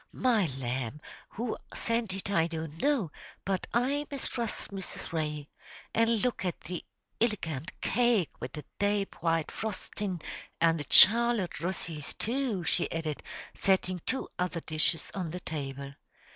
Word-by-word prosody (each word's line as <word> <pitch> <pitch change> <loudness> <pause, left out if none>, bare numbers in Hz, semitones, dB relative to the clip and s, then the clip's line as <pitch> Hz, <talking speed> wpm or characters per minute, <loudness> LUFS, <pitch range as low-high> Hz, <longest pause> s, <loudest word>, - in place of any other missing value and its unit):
"My 230 -8 +3
lamb, 130 +1 -2 0.3
who 230 +1 -2 0.2
sent 230 -4 0
it 195 +1 -2
I 165 -4 +4
don't 160 -1 -5
know, 270 - +2 0.3
but 190 -1 0
I 275 +6 +1
mistrust 240 -7 -3
Mrs. 190 -3 -5
Ray. 150 -2 -2 0.5
An' 230 0 +4
look 235 0 +1
at 180 -2 -1
the 180 -2 -5 0.4
illegant 170 - -1
cake 235 -5 +3
wid 125 - -5
the 150 -2 -6
dape 205 -2 0
white 165 -1 +1
frostin', 205 -3 -3 0.4
an' 165 0 +4
the 145 -3 -5
Charlotte 230 -5 +7
Russys 165 -3 -3
too!" 235 -5 0
she - - +1
added, 160 -3 -2 0.3
setting 185 -2 +2
two 265 - 0
other 180 -2 0
dishes 155 +1 +2
on 180 -4 -2
the 180 +3 -4
table. 140 -4 -5
185 Hz, 140 wpm, -30 LUFS, 160-225 Hz, 0.5 s, Charlotte